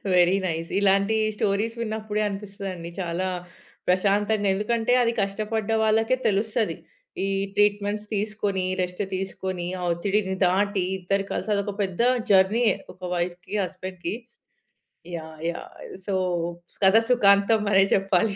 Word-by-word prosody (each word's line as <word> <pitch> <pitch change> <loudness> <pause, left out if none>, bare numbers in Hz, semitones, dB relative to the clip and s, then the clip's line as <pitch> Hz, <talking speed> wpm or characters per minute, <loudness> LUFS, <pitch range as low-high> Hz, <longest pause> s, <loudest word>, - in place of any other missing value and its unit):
Very 180 +2 +5
nice. 165 0 -3
ఇలాంటి 200 +2 +3 0.2
stories 210 +3 0
విన్నప్పుడే 215 -1 -2
అనిపిస్తదండి 195 -4 -6
చాలా 175 +2 -2 0.6
ప్రశాంతంగా. 205 +3 +2
ఎందుకంటే 230 +3 +1
అది 230 - +2
కష్టపడ్డ 215 +2 -2
వాళ్ళకే 225 +3 +3
తెలుస్తది. 215 +2 0 0.5
ఈ - - -1 0.3
ట్రీట్‌మెంట్స్ 205 0 +2
తీసుకొని, 205 -2 -1 0.2
రెస్ట్ 180 +3 -3
తీసుకొని, 185 -1 -4
ఆ - - -3
ఒత్తిడిని 190 +2 0
దాటి 200 +2 +1 0.2
ఇద్దరు 195 +2 0
కలిసి, - - -3
అది 200 - +1
ఒక 205 - -3
పెద్ద 190 +1 -2 0.3
జర్నీయే 205 +5 +4 0.2
ఒక - - -28 0.2
వైఫ్‌కి, 175 +2 -4
హస్బెండ్‌కి. 185 -1 -5 1.0
యాహ్! 160 -1 -8
యాహ్! 170 - -6 0.3
సో, 200 - -2 0.7
కథ 190 +3 +7
సుఖాంతం 205 -2 +5
అనే 195 -1 +6
చెప్పాలి. 195 +1 +2
200 Hz, 120 wpm, -25 LUFS, 185-210 Hz, 1.0 s, కథ